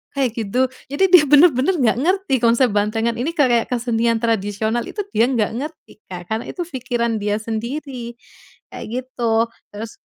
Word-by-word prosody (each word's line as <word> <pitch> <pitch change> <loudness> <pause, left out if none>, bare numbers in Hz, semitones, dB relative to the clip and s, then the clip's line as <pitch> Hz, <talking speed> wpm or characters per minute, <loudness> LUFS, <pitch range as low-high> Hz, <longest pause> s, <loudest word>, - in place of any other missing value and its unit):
kayak 265 -4 +1
gitu?" 250 +5 0 0.2
Jadi 285 +7 -1
dia 360 -4 +8
bener-bener 295 +2 +5
nggak 245 -9 +2
ngerti 370 +1 0
konsep 235 +1 +3
bantengan 225 +3 0
ini 315 +7 -2
kayak 245 -6 +2
kesenian 235 -1 0
tradisional 220 +1 -1
itu, 415 - -4
dia 230 - +3
nggak 235 -5 0
ngerti, 300 -6 -9
Kak, 180 +1 -9
karena 220 +2 -2
itu 355 - -4
pikiran 240 -7 -2
dia 205 0 -1
sendiri, 240 +2 -5 0.6
kayak - - -7 0.2
gitu. 230 -2 0 0.2
Terus 215 +1 -6
235 Hz, 155 wpm, -20 LUFS, 225-270 Hz, 0.6 s, dia